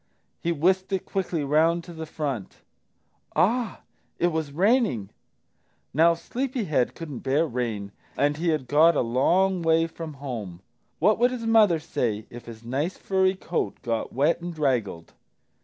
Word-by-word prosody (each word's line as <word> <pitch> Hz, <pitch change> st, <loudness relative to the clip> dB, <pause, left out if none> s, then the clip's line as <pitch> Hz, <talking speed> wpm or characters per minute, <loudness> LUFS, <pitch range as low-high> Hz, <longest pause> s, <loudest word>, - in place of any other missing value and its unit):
He 170 Hz, -, 0 dB
whisked 185 Hz, +5 st, +1 dB
it 190 Hz, -, -1 dB
quickly 180 Hz, -5 st, -2 dB
round 160 Hz, +4 st, +2 dB
to 175 Hz, -, -10 dB
the 160 Hz, -1 st, -7 dB
front. 140 Hz, -, -5 dB, 0.7 s
Ah, 230 Hz, +2 st, +1 dB, 0.4 s
it 175 Hz, -, +2 dB
was 160 Hz, -3 st, -3 dB
raining! 185 Hz, -, +2 dB, 0.8 s
Now 165 Hz, +3 st, +5 dB
Sleepy 250 Hz, +8 st, -3 dB
head 150 Hz, -9 st, 0 dB
couldn't 150 Hz, -7 st, -7 dB
bear 140 Hz, +5 st, +1 dB
rain, 115 Hz, -7 st, -3 dB, 0.3 s
and 145 Hz, +1 st, +2 dB
he 170 Hz, +3 st, -2 dB
had 150 Hz, -5 st, 0 dB
got 155 Hz, +4 st, +5 dB
a -, -, +2 dB
long 175 Hz, +10 st, +2 dB
way 165 Hz, 0 st, +3 dB
from 165 Hz, -2 st, -7 dB
home. 115 Hz, -10 st, -6 dB, 0.4 s
What 210 Hz, +7 st, +3 dB
would 245 Hz, +1 st, +2 dB
mother 220 Hz, -6 st, +4 dB
say 115 Hz, -9 st, -2 dB
if 120 Hz, 0 st, -10 dB
his 115 Hz, -1 st, -10 dB
nice 140 Hz, +9 st, -2 dB
furry 190 Hz, 0 st, +1 dB
coat 175 Hz, -2 st, -3 dB
got 115 Hz, -1 st, -2 dB
wet 145 Hz, +7 st, +1 dB
and 175 Hz, +1 st, -4 dB
draggled? 125 Hz, -, -1 dB
160 Hz, 155 wpm, -25 LUFS, 130-185 Hz, 0.8 s, Now